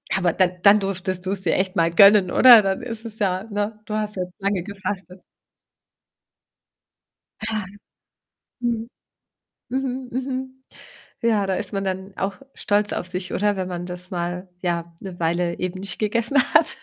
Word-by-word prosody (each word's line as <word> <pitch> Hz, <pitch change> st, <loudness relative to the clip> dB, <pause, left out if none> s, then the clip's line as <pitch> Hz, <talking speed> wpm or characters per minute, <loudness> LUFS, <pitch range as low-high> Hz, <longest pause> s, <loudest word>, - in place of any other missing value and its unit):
Aber 180 Hz, -3 st, +1 dB
dann 185 Hz, -2 st, +2 dB
dann 205 Hz, +1 st, +7 dB
durftest 190 Hz, -1 st, -3 dB
du's 190 Hz, 0 st, -2 dB
dir -, -, +1 dB
echt 190 Hz, +1 st, -1 dB
mal 165 Hz, 0 st, +3 dB
gönnen, 200 Hz, +1 st, +7 dB
oder? 240 Hz, -4 st, +9 dB
Dann 195 Hz, +2 st, -1 dB
ist 230 Hz, -2 st, -1 dB
es 220 Hz, -1 st, -3 dB
ja 190 Hz, -1 st, 0 dB
ne? 210 Hz, 0 st, -3 dB
Du 210 Hz, -, -6 dB
hast 210 Hz, -1 st, -2 dB
ja 185 Hz, -, -1 dB
jetzt 180 Hz, +1 st, -13 dB
lange 195 Hz, -2 st, -1 dB
gefastet. 190 Hz, -2 st, -6 dB, 2.2 s
Ja. 215 Hz, -3 st, -2 dB, 0.9 s
Mhm. 235 Hz, -1 st, -2 dB, 0.8 s
Mhm, 260 Hz, 0 st, -3 dB
mhm. 260 Hz, 0 st, -4 dB, 0.6 s
Ja, 215 Hz, -4 st, +2 dB
da 190 Hz, -, 0 dB
ist -, -, -4 dB
man 195 Hz, -1 st, -2 dB
dann 190 Hz, 0 st, -4 dB
auch 195 Hz, +1 st, -2 dB, 0.2 s
stolz 205 Hz, 0 st, 0 dB
auf -, -, -3 dB
sich, 180 Hz, 0 st, -4 dB
oder? 205 Hz, 0 st, +1 dB
Wenn 185 Hz, -1 st, -3 dB
man 175 Hz, 0 st, -5 dB
das 180 Hz, 0 st, -7 dB
mal, 180 Hz, +1 st, -4 dB
ja, 170 Hz, -1 st, -2 dB
'ne 185 Hz, -2 st, -8 dB
Weile 170 Hz, +1 st, 0 dB
eben 185 Hz, +1 st, -4 dB
nicht 195 Hz, -2 st, -2 dB
gegessen 235 Hz, +6 st, +1 dB, 0.2 s
hat. 315 Hz, +1 st, +4 dB
195 Hz, 165 wpm, -22 LUFS, 180-215 Hz, 2.2 s, oder